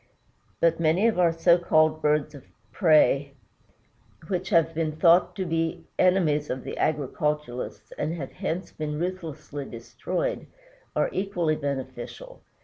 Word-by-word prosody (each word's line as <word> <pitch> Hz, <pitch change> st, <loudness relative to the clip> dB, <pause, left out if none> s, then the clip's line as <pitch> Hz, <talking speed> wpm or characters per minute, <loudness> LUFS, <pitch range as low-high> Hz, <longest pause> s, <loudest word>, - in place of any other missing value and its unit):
But 165 Hz, -1 st, +3 dB
many 165 Hz, +6 st, +2 dB
of 220 Hz, -5 st, +1 dB
our 170 Hz, -2 st, +5 dB
so 170 Hz, +1 st, +4 dB
called 155 Hz, -2 st, +3 dB
birds 150 Hz, 0 st, +1 dB
of 140 Hz, -, -11 dB, 0.3 s
prey, 145 Hz, -2 st, +3 dB, 1.0 s
which 185 Hz, -1 st, -2 dB
have 165 Hz, -3 st, +3 dB
been 160 Hz, -1 st, -1 dB
thought 170 Hz, +2 st, +4 dB
to 190 Hz, -, -2 dB
be 165 Hz, -1 st, -2 dB
the -, -, +2 dB
enemies 165 Hz, -6 st, +2 dB
of 130 Hz, 0 st, -3 dB
the -, -, -6 dB
agriculturist 150 Hz, -3 st, -2 dB
and 155 Hz, +3 st, -1 dB
have 140 Hz, -6 st, -6 dB
hence 185 Hz, -1 st, -4 dB
been 150 Hz, -1 st, -4 dB
ruthlessly 155 Hz, -5 st, -5 dB
destroyed, 135 Hz, -, -4 dB, 0.5 s
are -, -, +1 dB
equally 180 Hz, -5 st, 0 dB
beneficial. 145 Hz, -, -6 dB
160 Hz, 140 wpm, -26 LUFS, 150-175 Hz, 1.0 s, our